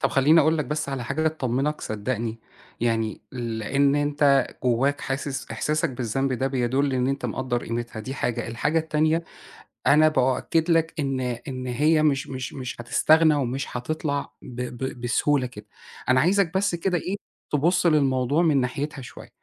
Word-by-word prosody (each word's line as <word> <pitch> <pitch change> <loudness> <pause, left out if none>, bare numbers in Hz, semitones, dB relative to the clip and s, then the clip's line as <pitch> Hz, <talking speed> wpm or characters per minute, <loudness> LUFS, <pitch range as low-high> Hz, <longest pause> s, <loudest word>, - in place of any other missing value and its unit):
طَب - - +2
خلّيني 150 +5 +5
أقول 160 +2 +2
لك 150 - 0
بس 150 +3 -3
على 135 -3 -3
حاجة 160 +6 0
تطمنك 145 0 -1
صدقني. 110 +1 -3 0.4
يعني 115 -2 0
لإن 125 +3 0
أنت 145 -1 +3 0.2
جواك 130 +4 +2
حاسس 135 0 -4
إحساسك 155 -1 0
بالذنب 130 +2 -1
ده 130 +1 0
بيدل 135 +1 0
إن 125 0 +1
أنت 135 0 -2
مقدّر 125 -2 -2
قيمتها 115 -1 -4
دي 130 +5 -6
حاجة، 120 -3 -2
الحاجة 150 +8 0
التانية 160 +1 +1 0.6
أنا 155 +2 +6
بأكد 155 +4 +1
لك 165 -1 +2
إن 135 -3 -1
إن 130 +1 -4
هي 150 +5 +2
مش 140 -3 +1
مش 130 -2 -5
مش 125 -3 -6
هتستغنى 155 +6 +4
ومش 135 -1 -1
هتطلَع 140 +2 -3
ب 125 -1 -8
ب 125 0 -5
بسهولة 125 +3 +1
كده. 105 -4 -11 0.4
أنا 130 0 +5
عايزك 185 +1 +2
بس 190 -2 +1
كده 175 +1 0
إيه 185 +5 -3 0.4
تبص 170 +5 +2
للموضوع 140 -1 +2
من 155 -5 +3
ناحيتها 140 +3 -3
شوية. 120 - -11
135 Hz, 160 wpm, -25 LUFS, 125-155 Hz, 0.6 s, أنا